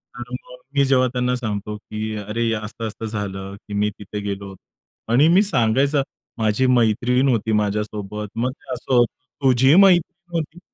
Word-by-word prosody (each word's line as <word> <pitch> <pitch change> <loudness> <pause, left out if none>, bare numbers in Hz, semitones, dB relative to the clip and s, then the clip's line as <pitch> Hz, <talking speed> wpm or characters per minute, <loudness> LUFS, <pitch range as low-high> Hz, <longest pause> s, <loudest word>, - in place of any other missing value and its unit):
तर 120 0 -8
मग 125 0 -8 0.2
मी 140 - +4
जेव्हा 130 -1 +3
त्यांना 125 0 0
सांगतो 105 -3 -4
की 110 +1 -5
अरे, 105 +3 -4
हे - - +1
असं-असं 110 +1 -5
झालं, 100 -2 -5
की 105 - -7
मी 105 +1 +1
तिथे 105 +1 -6
गेलो 100 -1 -5 0.6
आणि 140 +6 +5
मी 180 +4 +6
सांगायचं, 140 - +2 0.4
माझी 110 +3 +1
मैत्रीण 125 +2 +3
होती 110 -2 +1
माझ्यासोबत. 105 0 -3
मग 125 +3 0
ते - - -13
असं 130 - -4
होतं, 120 -1 +4 0.3
"तुझी 130 +3 +5
मैत्रीण 175 -2 +3
होती?" 160 +2 -5
115 Hz, 160 wpm, -21 LUFS, 105-130 Hz, 0.6 s, मी